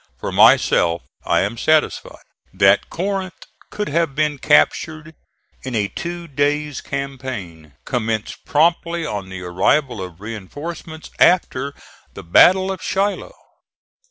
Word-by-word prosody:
For -, -, -5 dB
myself 85 Hz, 0 st, +4 dB, 0.2 s
I -, -, +3 dB
am 105 Hz, +4 st, -3 dB
satisfied 155 Hz, +2 st, 0 dB, 0.3 s
that 100 Hz, +1 st, +4 dB
Corinth 190 Hz, +1 st, -4 dB, 0.2 s
could 210 Hz, 0 st, -4 dB
have 160 Hz, -2 st, 0 dB
been 150 Hz, -2 st, 0 dB
captured 155 Hz, +2 st, +1 dB, 0.5 s
in 130 Hz, -2 st, -5 dB
a 105 Hz, -2 st, 0 dB
two 170 Hz, 0 st, -6 dB
days' 145 Hz, 0 st, -1 dB
campaign 130 Hz, -, -6 dB
commenced 110 Hz, -4 st, -3 dB
promptly 170 Hz, +2 st, +1 dB
on 100 Hz, -8 st, -5 dB
the 95 Hz, -1 st, -7 dB
arrival 115 Hz, +7 st, +1 dB
of 90 Hz, -2 st, -8 dB
reinforcements 145 Hz, -, -8 dB
after 140 Hz, -6 st, +2 dB, 0.4 s
the -, -, -9 dB
battle 185 Hz, -, +5 dB
of 190 Hz, -, -6 dB
Shiloh. 205 Hz, -, -2 dB
145 Hz, 120 wpm, -20 LUFS, 105-170 Hz, 0.5 s, battle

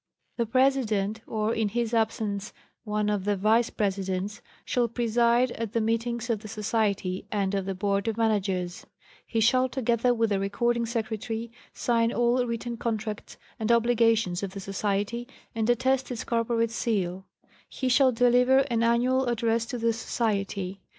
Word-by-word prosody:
The 235 Hz, -2 st, 0 dB
President, 225 Hz, -5 st, +1 dB
or, 220 Hz, 0 st, -1 dB
in 220 Hz, -2 st, 0 dB
his 235 Hz, +2 st, -2 dB
absence, 215 Hz, -2 st, -1 dB, 0.3 s
one 210 Hz, 0 st, -1 dB
of 205 Hz, -2 st, 0 dB
the 205 Hz, +1 st, +1 dB
Vice 220 Hz, +4 st, +3 dB
Presidents, 195 Hz, 0 st, -2 dB, 0.2 s
shall 245 Hz, -1 st, +1 dB
preside 235 Hz, +1 st, +2 dB
at 230 Hz, -2 st, -5 dB
the 230 Hz, -, +2 dB
meetings 230 Hz, +1 st, -1 dB
of 220 Hz, -, 0 dB
the 215 Hz, -, -10 dB
Society 210 Hz, -3 st, -1 dB
and 200 Hz, -2 st, 0 dB
of 195 Hz, -1 st, -1 dB
the 195 Hz, -, -2 dB
Board 200 Hz, +2 st, 0 dB
of 225 Hz, -1 st, -1 dB
Managers; 195 Hz, -5 st, -1 dB, 0.4 s
he 225 Hz, -, -1 dB
shall, 255 Hz, +3 st, +3 dB
together 245 Hz, -1 st, +1 dB
with 225 Hz, -2 st, +1 dB
the 200 Hz, -, +2 dB
Recording 235 Hz, +4 st, 0 dB
Secretary, 225 Hz, 0 st, -3 dB, 0.2 s
sign 230 Hz, -1 st, +1 dB
all 240 Hz, +1 st, +2 dB
written 235 Hz, 0 st, -4 dB
contracts 220 Hz, -2 st, -4 dB, 0.2 s
and 220 Hz, +1 st, +1 dB
obligations 230 Hz, -5 st, +3 dB
of 195 Hz, -2 st, -4 dB
the -, -, -4 dB
Society, 200 Hz, +4 st, -2 dB, 0.3 s
and 225 Hz, 0 st, -1 dB
attest 260 Hz, +2 st, +2 dB
its 245 Hz, -3 st, -4 dB
corporate 230 Hz, -1 st, 0 dB
seal; 190 Hz, -6 st, -2 dB, 0.4 s
he 260 Hz, -, -3 dB
shall 260 Hz, +1 st, +5 dB
deliver 250 Hz, +3 st, +4 dB
an 230 Hz, -1 st, +1 dB
annual 245 Hz, +3 st, +2 dB
address 230 Hz, -1 st, 0 dB
to 250 Hz, -, -4 dB
the 230 Hz, 0 st, +1 dB
Society. 200 Hz, -4 st, -2 dB
225 Hz, 155 wpm, -27 LUFS, 205-235 Hz, 0.4 s, shall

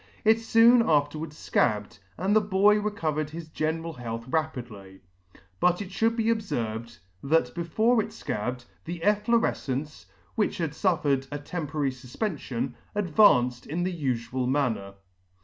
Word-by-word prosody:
It 220 Hz, +1 st, +5 dB
Soon 230 Hz, +2 st, +6 dB
afterwards 150 Hz, -3 st, 0 dB
Scabbed, 105 Hz, -3 st, 0 dB, 0.2 s
and 195 Hz, +3 st, +1 dB
the 215 Hz, -, +6 dB
boy 205 Hz, +1 st, +4 dB
recovered 155 Hz, -8 st, -2 dB
his 160 Hz, 0 st, -8 dB
general 160 Hz, +2 st, -2 dB
health 115 Hz, -2 st, -6 dB
rapidly. 120 Hz, -11 st, -4 dB, 0.6 s
But 180 Hz, 0 st, +3 dB
it 200 Hz, -2 st, -6 dB
Should 225 Hz, +4 st, +1 dB
be 230 Hz, -, 0 dB
obferved, 120 Hz, -, -2 dB, 0.2 s
that 135 Hz, -4 st, +1 dB
before 220 Hz, +8 st, +2 dB
it -, -, -6 dB
Scabbed, 125 Hz, +4 st, -4 dB, 0.2 s
the 170 Hz, 0 st, -5 dB
efflorefcence, 205 Hz, -, 0 dB, 0.3 s
which 215 Hz, -, 0 dB
had 160 Hz, -4 st, -2 dB
Suffered 145 Hz, -7 st, +1 dB
a 145 Hz, -, -3 dB
temporary 145 Hz, -2 st, -3 dB
fufpenfion, 130 Hz, -, -4 dB, 0.2 s
advanced 150 Hz, -, +4 dB
in 175 Hz, +4 st, -2 dB
theufual 130 Hz, -7 st, -2 dB
manner. 120 Hz, -8 st, -1 dB
155 Hz, 130 wpm, -27 LUFS, 125-200 Hz, 0.6 s, Soon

